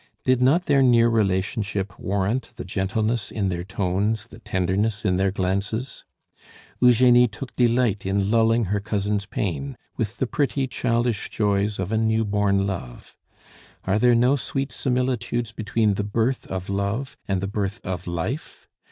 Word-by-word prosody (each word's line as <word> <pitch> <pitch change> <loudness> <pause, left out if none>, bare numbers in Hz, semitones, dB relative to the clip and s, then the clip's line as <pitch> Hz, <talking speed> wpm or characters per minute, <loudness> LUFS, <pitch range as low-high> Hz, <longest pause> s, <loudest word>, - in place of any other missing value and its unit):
Did 130 -1 +3
not 155 +8 +3
their 140 -2 +4
near 120 -3 +5
relationship 100 -2 -1
warrant 105 +6 -1
the 120 - -7
gentleness 105 +4 -1
in 100 -3 -1
their 85 -1 -3
tones, 100 +4 -1
the - - -13
tenderness 100 +2 -1
in 90 -2 +2
their 95 +1 +2
glances? 100 +6 -2 0.7
Eugenie 125 0 +6
took 120 +4 -9
delight 120 -4 +2
in 100 +1 0
lulling 115 0 +3
her 105 - +1
cousin's 100 -1 -2
pain 115 +8 -3 0.2
with 115 -1 -2
the - - 0
pretty 135 +1 0
childish 120 -3 -1
joys 105 -1 0
of 95 +1 -3
a 110 - +1
new 110 0 +1
born 100 -1 +1
love. 85 -11 -6 0.7
Are 100 +3 +1
there 120 +1 +5
no 125 +4 +4
sweet 135 0 -3
similitudes 125 -3 -1
between 110 -1 0
the 100 - -2
birth 115 +5 -1
of 95 0 -4
love 100 +7 -2
and 95 -2 0
the 95 - -2
birth 100 +2 -3
of 90 -1 -5
life? 90 - -4
105 Hz, 155 wpm, -24 LUFS, 100-120 Hz, 0.7 s, Eugenie